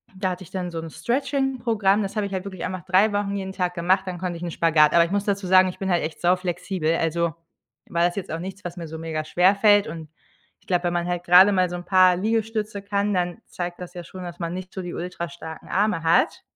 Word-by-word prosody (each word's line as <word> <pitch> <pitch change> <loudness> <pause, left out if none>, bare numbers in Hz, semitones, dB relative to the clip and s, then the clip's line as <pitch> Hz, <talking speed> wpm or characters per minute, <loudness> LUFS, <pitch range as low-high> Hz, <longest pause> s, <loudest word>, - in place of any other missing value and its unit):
da 185 0 -1
hatte 180 +1 -6
ich - - -15
dann 180 -2 -4
so 165 - -4
‘n 165 0 -6
Stretching 270 - -1
Programm, 215 -3 +2
das 195 +2 -4
habe 210 - 0
ich 200 - -6
halt 190 0 -3
wirklich 190 -3 -5
einfach 185 -3 -5
3 190 +3 +4
Wochen 205 0 -1
jeden 190 -1 -4
Tag 180 -2 -1
gemacht, 185 +2 +1
dann 180 -1 -4
konnte 180 -2 -3
ich 175 - -9
‘n 170 - -3
Spagat, 155 -3 +4
aber 170 0 +6
ich 170 - -7
muss 200 0 0
dazu 200 -2 -1
sagen, 185 0 +6
ich 180 - -9
bin 195 -1 -2
halt 175 -3 +2
echt 155 - -5
sau 180 +1 +4
flexibel, 180 -2 -2
also, 165 0 0 0.6
war 170 0 +2
das 175 - 0
jetzt 200 - -5
auch 165 - -3
nichts, 190 +3 -7
was 175 +1 -6
mir 170 -2 -6
so 160 - -7
mega 160 -1 -3
schwer 180 +5 +3
fällt 205 0 +4
und 160 -1 -8 0.5
ich 205 - -32
glaube, 180 -2 +1
wenn 175 - 0
man 175 0 -1
halt 175 0 -2
gerade 180 +3 +7
mal 185 -2 +2
so 175 - -5
‘n 175 0 -7
paar 185 -1 +5
Liegestütze 215 0 -1
kann, 200 +1 -1
dann 175 -2 -1
zeigt 175 0 -6
das 180 0 -8
ja 175 - -7
schon, 185 +2 -10
dass 175 -1 -8
man 170 -1 -3
nicht 185 0 -7
so 190 - -4
die 175 -1 -6
ultra 175 -1 -5
starken 160 -2 -10
Arme 200 -4 0
hat. 165 +1 +2
180 Hz, 270 wpm, -24 LUFS, 170-200 Hz, 0.6 s, gerade